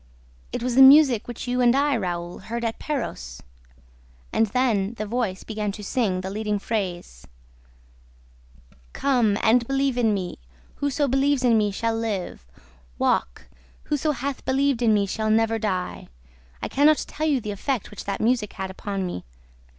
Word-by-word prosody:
It - - -4
was 250 0 -1
the 265 - +6
music 265 -4 +7
which 240 +1 -7
you 250 0 0
and 245 0 +4
I, 285 0 +2
Raoul, 175 -4 -3
heard 235 +4 -4
at 225 - -3
Perros. 65 - -4 0.9
And 225 - +3
then 220 -2 0
the 215 - -4
voice 215 -4 -2
began 215 -2 -3
to 210 - -8
sing 200 -4 0
the 190 +1 -5
leading 210 0 -1
phrase, 180 - -4 1.7
'Come! 240 -7 +2
And 235 +1 +4
believe 270 -2 0
in 225 -3 +3
me! 185 - -3 0.4
Whoso 285 0 0
believes 270 +1 +1
in 240 -2 +4
me 210 -1 +2
shall 225 +3 -1
live! 205 - -4 0.5
Walk! - - 0 0.4
Whoso 300 +1 -1
hath 275 +1 -4
believed 270 -1 +1
in 230 -2 +4
me 205 -2 +3
shall 215 +2 -2
never 225 +1 +2
die! 185 -4 -3 0.3
...' 60 0 -29
I - - -1
can 285 +2 +3
not 310 -1 +3
tell 310 +1 -3
you 285 -4 +2
the 210 -3 -5
effect 235 +3 -3
which 210 - -9
that 200 - -3
music 225 -2 +1
had 190 -1 -5
upon 195 0 -4
me. 135 - -5
225 Hz, 170 wpm, -24 LUFS, 200-255 Hz, 1.7 s, music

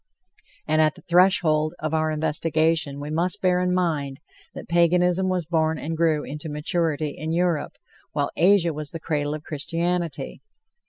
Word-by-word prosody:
And 155 +1 +3
at 155 -1 +2
the - - -16
threshold 170 -4 +3
of 155 0 -4
our 155 0 +1
investigation 155 -1 0
we 145 +1 -6
must 170 +3 0
bear 180 -1 +2
in 180 0 0
mind 155 -7 -1 0.4
that - - -8
Paganism 180 +2 +3
was 180 -2 -1
born 160 -1 +1
and 160 +2 -4
grew 160 -2 +1
into 150 +2 -6
maturity 150 0 -1
in 155 +3 -4
Europe, 170 -3 0 0.3
while - - -1
Asia 175 -1 +4
was 150 0 -6
the 165 - -7
cradle 150 -2 -2
of 155 - -8
Christianity. 165 -1 -3
160 Hz, 160 wpm, -24 LUFS, 150-175 Hz, 0.4 s, Asia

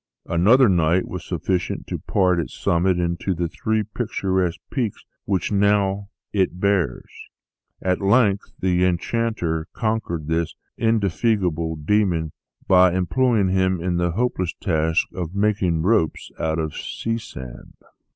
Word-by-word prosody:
Another 110 +10 +5
night 85 -1 +2
was 90 -1 -6
sufficient 90 +1 -2
to - - -4
part 90 -3 +1
its 80 - -5
summit 90 +2 +2
into 85 +2 -1
the 85 +1 -1
three 110 +6 -1
picturesque 95 -5 -1
peaks 120 -7 -2 0.2
which 95 -2 -1
it - - -1
now 100 0 +2 0.4
bears. 90 -7 0 0.8
At 90 0 0
length 100 0 +2
the 90 -1 +1
enchanter 90 -3 -1
conquered 110 -9 -2
this 80 +1 -1 0.2
indefatigable 100 -6 +1
demon, 85 -1 +1 0.4
by 90 -1 +6
employing 105 +2 +2
him 95 -1 +1
in 85 0 -1
the 85 -1 0
hopeless 95 -5 -1
task 80 -3 +1
of 90 0 -5
making 100 -6 +1
ropes 95 -5 +1
out 80 0 0
of 80 -2 -3
sea 115 0 -3
sand." 65 - -10
90 Hz, 130 wpm, -22 LUFS, 85-105 Hz, 0.8 s, by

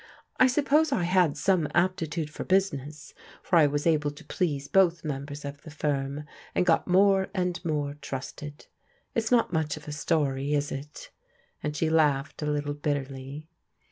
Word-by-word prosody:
I 255 - +7
suppose 295 +4 +3
I 180 - +1
had 175 -4 +3
some 170 0 +2
aptitude 165 -3 0
for - - -5
business, 155 -6 -1 0.3
for 175 - +3
I 155 -3 +7
was 145 +1 -2
able 150 -3 +2
to 145 - -12
please 145 -6 -1
both 175 -3 +3
members 145 0 -5
of 140 0 -7
the 160 - -11
firm, 145 -1 -2 0.3
and - - +2
got 165 -2 +3
more 190 +1 +4
and 180 -1 -1
more 150 -4 -1
trusted. 140 +2 -7 0.5
It 230 - +1
is 225 - -4
not 235 -7 +3
much 155 -2 0
of 150 - -12
a - - -4
story, 145 -2 0
is 145 0 -1
it?" 145 +2 -8 0.5
and 150 0 -3
she 160 - +1
laughed 150 -3 +2
a 150 - -2
little 145 -1 -1
bitterly. 140 0 -4
150 Hz, 170 wpm, -27 LUFS, 145-180 Hz, 0.5 s, I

